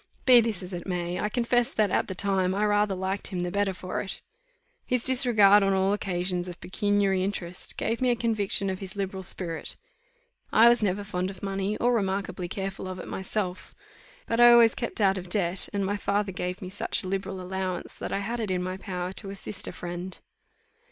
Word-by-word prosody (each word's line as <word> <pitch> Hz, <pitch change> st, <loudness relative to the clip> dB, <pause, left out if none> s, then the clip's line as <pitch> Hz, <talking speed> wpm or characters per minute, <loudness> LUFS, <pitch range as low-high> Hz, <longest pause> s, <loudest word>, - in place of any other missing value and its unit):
Be 250 Hz, -2 st, +9 dB
this 220 Hz, -5 st, -2 dB
as 180 Hz, +1 st, -8 dB
it 175 Hz, +1 st, -6 dB
may, 175 Hz, -1 st, -2 dB
I 210 Hz, -, -1 dB
confess 240 Hz, +1 st, +1 dB
that, 210 Hz, -3 st, +2 dB
at -, -, +1 dB
the 190 Hz, -, -5 dB
time, 190 Hz, -1 st, +1 dB
I 210 Hz, +1 st, +1 dB
rather 205 Hz, -1 st, +2 dB
liked 190 Hz, +2 st, -2 dB
him 180 Hz, -2 st, -3 dB
the 180 Hz, 0 st, -2 dB
better 200 Hz, 0 st, +1 dB
for 185 Hz, 0 st, -4 dB
it. 190 Hz, -, -6 dB, 0.6 s
His 250 Hz, -2 st, -1 dB
disregard, 225 Hz, -6 st, +6 dB
on 195 Hz, 0 st, +2 dB
all 190 Hz, +1 st, +2 dB
occasions, 180 Hz, -2 st, -1 dB
of 175 Hz, -1 st, -8 dB
pecuniary 200 Hz, -1 st, +1 dB
interest, 180 Hz, -3 st, -3 dB
gave 230 Hz, +2 st, -1 dB
me 255 Hz, -, +3 dB
a 240 Hz, -, +3 dB
conviction 210 Hz, -4 st, +1 dB
of 185 Hz, -, -5 dB
his 195 Hz, +1 st, -7 dB
liberal 195 Hz, -1 st, -3 dB
spirit. 175 Hz, -3 st, -4 dB, 0.8 s
I 230 Hz, +2 st, +7 dB
was 240 Hz, -1 st, +3 dB
never 205 Hz, 0 st, 0 dB
fond 185 Hz, -2 st, -3 dB
of 195 Hz, 0 st, -11 dB
money, 195 Hz, +1 st, -2 dB
or 245 Hz, +1 st, +2 dB
remarkably 190 Hz, -4 st, -1 dB
careful 195 Hz, +1 st, -5 dB
of 185 Hz, 0 st, -5 dB
it -, -, -8 dB
myself; 190 Hz, -1 st, -4 dB, 0.5 s
but 230 Hz, -, -1 dB
I 240 Hz, 0 st, +9 dB
always 235 Hz, -1 st, +7 dB
kept 235 Hz, -, -4 dB
out 195 Hz, -2 st, +3 dB
of 180 Hz, -1 st, -10 dB
debt; 180 Hz, -1 st, +1 dB
and 200 Hz, -1 st, -1 dB
my 205 Hz, +2 st, -1 dB
father 200 Hz, 0 st, -1 dB
gave 180 Hz, +2 st, -4 dB
me 185 Hz, -, -6 dB
such 200 Hz, -, -1 dB
a -, -, -6 dB
liberal 195 Hz, 0 st, -3 dB
allowance, 185 Hz, 0 st, -4 dB
that -, -, -5 dB
I 200 Hz, -, -1 dB
had 230 Hz, +4 st, -3 dB
it 220 Hz, -3 st, -2 dB
in 180 Hz, -1 st, -1 dB
my 185 Hz, +1 st, -4 dB
power 185 Hz, -1 st, -5 dB
to 195 Hz, 0 st, -6 dB
assist 195 Hz, 0 st, -4 dB
a -, -, -4 dB
friend. 175 Hz, +1 st, -6 dB
195 Hz, 210 wpm, -27 LUFS, 185-210 Hz, 0.8 s, Be